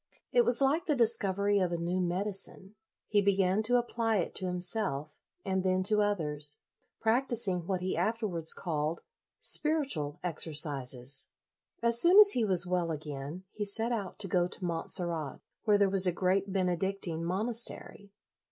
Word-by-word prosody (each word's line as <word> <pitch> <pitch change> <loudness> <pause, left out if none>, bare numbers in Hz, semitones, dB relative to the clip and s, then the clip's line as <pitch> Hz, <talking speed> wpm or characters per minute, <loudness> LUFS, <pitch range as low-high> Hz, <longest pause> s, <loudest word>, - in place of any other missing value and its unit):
It 245 - +4
was 245 +2 +2
like 295 +6 +1
the 300 - +1
discovery 205 -4 +2
of 180 -2 0
a 170 - -2
new 175 +2 -2
medicine. 190 +2 -3 0.3
He 205 -1 +2
began 195 0 +1
to 235 +3 0
apply 230 -2 -1
it 180 - -2
to 185 - -3
himself, 175 -5 -3 0.2
and 190 -1 -1
then 185 0 +1
to 210 +2 +3
others, 150 -8 -1 0.4
practising 225 -7 0
what 185 -2 -2
he 185 +1 -2
afterwards 210 -8 -1
called 155 -2 -3 0.3
" - - -62
spiritual 275 - -1
exercises. 140 -5 -1 0.3
'! - - -42
As 235 0 +5
soon 355 +3 +6
as 415 -1 +9
he 240 - +1
was 185 -4 +5
well 180 -1 -1
again, 150 +2 -6
he 210 - -5
set 225 +4 -2
'out 205 -6 -4
to 210 - -1
go 175 -1 +1
to 180 - -7
Montserrat, 165 -3 -1 0.3
where 210 -2 +4
there 200 -1 +3
was 190 -1 +7
a - - +3
great 190 +2 -1
Benedictine 185 -2 -1
monastery. 205 +1 -2
190 Hz, 160 wpm, -30 LUFS, 170-215 Hz, 0.4 s, as